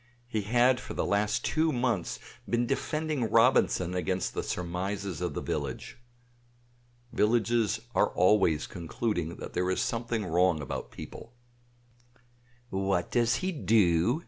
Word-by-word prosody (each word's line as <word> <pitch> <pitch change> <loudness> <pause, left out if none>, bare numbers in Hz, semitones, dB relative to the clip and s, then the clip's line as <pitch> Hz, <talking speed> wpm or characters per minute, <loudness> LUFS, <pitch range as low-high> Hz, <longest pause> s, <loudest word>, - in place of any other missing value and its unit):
He 110 -3 -1
had 120 +4 +3
for - - -8
the - - 0
last 105 +4 0
two 160 +1 +2
months 120 - -1 0.3
been 120 0 +1
defending 145 -1 -1
Robinson 115 -6 +3
against 90 +1 -1
the - - -2
surmises 90 0 -3
of - - -2
the - - -3
village. 70 - -4 1.1
Villages 115 -1 +2
are 105 - +3
always 90 -5 +3
concluding 85 0 -3
there 90 +1 -3
is 95 - 0
something 115 -2 -1
wrong 90 -1 +2
about 70 - -5
people. 120 - -10 1.4
"What 95 -2 0
does 120 -1 +2
he 190 - 0
do?" 110 - +3
105 Hz, 125 wpm, -29 LUFS, 90-120 Hz, 1.4 s, had